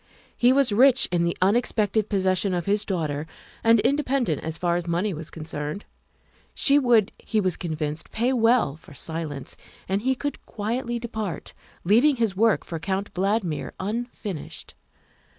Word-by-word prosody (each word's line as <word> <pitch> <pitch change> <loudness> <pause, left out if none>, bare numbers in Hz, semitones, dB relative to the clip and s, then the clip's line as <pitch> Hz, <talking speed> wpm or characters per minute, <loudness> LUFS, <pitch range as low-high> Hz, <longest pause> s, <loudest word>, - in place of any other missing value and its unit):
He 245 +1 +4
was 270 -3 +3
rich 260 +4 +5
in 170 -1 +2
the 170 - -1
unexpected 215 0 +1
possession 190 -1 +1
of 175 - -2
his 205 +1 +1
daughter 155 -5 -2 0.4
and 230 0 +5
independent 255 - 0
as 160 0 -3
far 175 -2 0
as 175 0 -2
money 180 +4 0
was 160 0 -7
con 160 - -8
cerned. 150 +4 -4 0.7
She 285 0 +5
would, 235 -6 +3
he 220 - -1
was 185 -4 +1
convinced, 155 -2 -4
pay 240 +4 0
well 230 - +3
for 155 -2 -16
silence, 155 -2 -5 0.3
and 195 +2 0
he 260 +3 +1
could 285 +3 -4
quietly 235 +3 -2
depart, 220 -5 -5 0.3
leaving 240 - +4
his 225 -5 0
work 220 +1 +3
for 165 - -5
Count 195 +3 -3
Valdmir 190 -4 -1
unfinished. 210 - -5
200 Hz, 155 wpm, -25 LUFS, 170-235 Hz, 0.7 s, rich